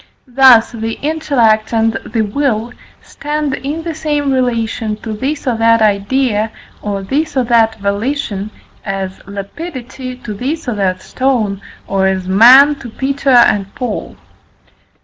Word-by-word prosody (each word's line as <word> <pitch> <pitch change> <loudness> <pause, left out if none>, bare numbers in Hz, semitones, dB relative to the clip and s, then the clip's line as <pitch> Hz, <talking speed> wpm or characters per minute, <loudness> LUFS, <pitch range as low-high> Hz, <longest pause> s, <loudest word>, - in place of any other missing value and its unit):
Thus 255 -3 +5
the 225 -1 -4
intellect 260 -9 +1
and 225 -1 +1
the 225 0 -2
will 235 0 -1 0.3
stand 295 -1 -3
in 300 +4 -4
the 335 -1 -4
same 295 -3 -1
relation 230 -3 -1
to 220 - -4
this 275 +7 -3
or 250 -3 +1
that 230 0 +4
idea, 215 +2 +1 0.3
or 200 -2 -3
this 290 +8 -2
or 260 - +3
that 230 -2 +3
volition, 205 0 -2 0.3
as 195 -1 -4
"lapidity" 255 - -7
to 240 -4 -7
this 275 +9 -4
or 245 - 0
that 185 -3 -1
stone, 230 -7 -1 0.2
or 195 -1 +1
as 190 -1 -1
"man" 250 +9 +7
to 240 - -8
Peter 275 +4 -2
and 210 -6 +4
Paul. 250 -6 -4
235 Hz, 140 wpm, -15 LUFS, 210-270 Hz, 0.3 s, man